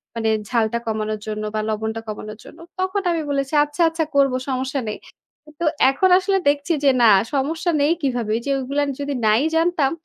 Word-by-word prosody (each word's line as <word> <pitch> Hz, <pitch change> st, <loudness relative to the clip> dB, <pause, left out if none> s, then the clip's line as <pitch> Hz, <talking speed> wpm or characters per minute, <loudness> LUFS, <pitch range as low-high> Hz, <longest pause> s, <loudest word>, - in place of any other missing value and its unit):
মানে 225 Hz, -1 st, 0 dB, 0.2 s
ঝালটা 230 Hz, -2 st, +1 dB
কমানোর 215 Hz, -1 st, -2 dB
জন্য 215 Hz, 0 st, -4 dB
বা -, -, 0 dB
লবণটা 220 Hz, +1 st, -3 dB
কমানোর 215 Hz, 0 st, -7 dB
জন্য।" -, -, -14 dB, 0.2 s
তখন 375 Hz, +2 st, 0 dB
আমি 335 Hz, -1 st, -1 dB
বলেছি, 275 Hz, 0 st, -2 dB
"আচ্ছা, 295 Hz, +4 st, -4 dB
আচ্ছা। 325 Hz, 0 st, -1 dB
করবো, 275 Hz, -2 st, +3 dB
সমস্যা 265 Hz, +1 st, -2 dB
নেই।" 210 Hz, -, -4 dB, 0.5 s
কিন্তু 300 Hz, +3 st, -6 dB, 0.2 s
এখন 370 Hz, +8 st, +2 dB
আসলে 385 Hz, +1 st, +1 dB
দেখছি 290 Hz, +3 st, 0 dB
যে 280 Hz, -, +5 dB
না 230 Hz, -, +7 dB, 0.2 s
সমস্যা 320 Hz, +6 st, -1 dB
নেই 290 Hz, +2 st, +3 dB
কিভাবে, 245 Hz, -6 st, -1 dB
এইযে 235 Hz, +4 st, -5 dB
এগুলো 275 Hz, +2 st, -2 dB, 0.2 s
যদি 285 Hz, 0 st, -3 dB
নাই 215 Hz, +3 st, +4 dB
জানতাম 325 Hz, -4 st, +2 dB
275 Hz, 180 wpm, -21 LUFS, 225-310 Hz, 0.5 s, না